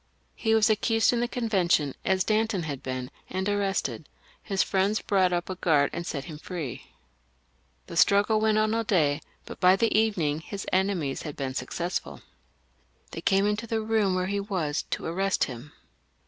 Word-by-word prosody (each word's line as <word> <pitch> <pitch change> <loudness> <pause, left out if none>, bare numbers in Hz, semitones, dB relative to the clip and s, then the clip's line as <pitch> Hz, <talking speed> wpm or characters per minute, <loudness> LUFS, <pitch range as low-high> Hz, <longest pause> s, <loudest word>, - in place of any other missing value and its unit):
He 220 -1 +1
was 220 -1 +4
accused 225 +2 +2
in 240 - +1
the 240 - +1
Conven 215 -8 0
tion 145 -5 +3
as 190 -1 +2
Danton 215 -4 +1
had 145 -4 -5
been, 130 -1 -5 0.2
and 190 +1 -2
arrested; 200 -1 -1 0.3
his 195 -2 0
friends 195 +2 +1
brought 190 -3 +2
up 175 -1 -1
a 185 - -3
guard 155 -6 +2
and 170 - -4
set 140 -3 -3
him 155 -3 -8
free. 160 -8 -6 1.0
The - - -9
struggle 200 +6 +4
went 215 -1 +3
on 215 0 +2
all 230 0 +1
day, 155 -8 +2 0.2
but - - -9
by 185 0 +6
the 225 +3 +1
evening 185 -9 +2
his 195 +4 -7
enemies 185 -8 0
had 150 -3 -6
been 135 -2 -3
successful. 170 +8 -4 0.9
They - - -6
came 195 +1 +3
into 210 +2 -1
the 225 0 0
room 215 -3 +1
where 185 0 0
he 200 +2 -1
was, 180 -7 -2
to - - -3
arrest 190 +3 0
him. 130 +2 -6
190 Hz, 180 wpm, -27 LUFS, 160-215 Hz, 1.0 s, by